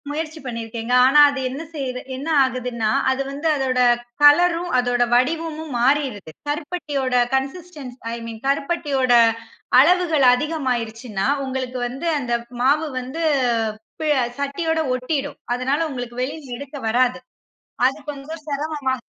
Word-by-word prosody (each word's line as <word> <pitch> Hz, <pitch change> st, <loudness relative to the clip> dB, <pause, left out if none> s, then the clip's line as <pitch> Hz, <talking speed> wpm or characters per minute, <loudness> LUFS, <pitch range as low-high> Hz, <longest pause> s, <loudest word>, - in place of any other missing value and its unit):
முயற்சி 315 Hz, +1 st, -4 dB
பண்ணியிருக்கேங்க. 230 Hz, 0 st, -4 dB
ஆனா 285 Hz, +3 st, +5 dB
அது 285 Hz, -1 st, -4 dB
என்ன 270 Hz, +4 st, -6 dB
செய் 280 Hz, -4 st, -3 dB, 0.3 s
என்ன 275 Hz, +4 st, -6 dB, 0.2 s
ஆகுதுன்னா 250 Hz, -4 st, -1 dB, 0.2 s
அது 265 Hz, +1 st, -1 dB
வந்து 290 Hz, +4 st, -3 dB
அதோட 260 Hz, -2 st, 0 dB, 0.4 s
கலரும் 345 Hz, +4 st, +5 dB
அதோட 245 Hz, 0 st, +2 dB
வடிவமும் 315 Hz, +3 st, -1 dB
மாறிறுது. 255 Hz, -, +1 dB, 0.2 s
கருப்பட்டியோட 290 Hz, -3 st, -2 dB, 0.2 s
கன்சிஸ்டென்சி. 275 Hz, -2 st, -5 dB, 0.2 s
ஐ -, -, -2 dB
மின் 225 Hz, -1 st, -8 dB
கருப்பட்டியோட 275 Hz, -3 st, +1 dB, 0.7 s
அளவுகள் 325 Hz, -1 st, +4 dB
அதிகமாயிருச்சுனா, 250 Hz, -7 st, -2 dB, 0.2 s
உங்களுக்கு 260 Hz, -1 st, -4 dB
வந்து 270 Hz, +7 st, -5 dB
அந்த 245 Hz, -3 st, -3 dB, 0.3 s
மாவு 295 Hz, +5 st, +3 dB
வந்து 260 Hz, +6 st, -6 dB, 0.8 s
ப -, -, -2 dB, 0.4 s
சட்டியோட 320 Hz, +4 st, -1 dB, 0.2 s
ஒட்டிடும். 275 Hz, +3 st, -3 dB, 0.2 s
அதனால 265 Hz, +4 st, 0 dB
உங்களுக்கு 245 Hz, -3 st, -6 dB
வெளியில 275 Hz, -2 st, -5 dB
எடுக்க 280 Hz, +2 st, -8 dB
வராது. 250 Hz, +3 st, +2 dB, 0.7 s
அது 270 Hz, +3 st, +2 dB
கொஞ்சம் 295 Hz, +3 st, -8 dB
சிரமமா? 290 Hz, -2 st, -2 dB
275 Hz, 120 wpm, -21 LUFS, 250-305 Hz, 0.8 s, ஆனா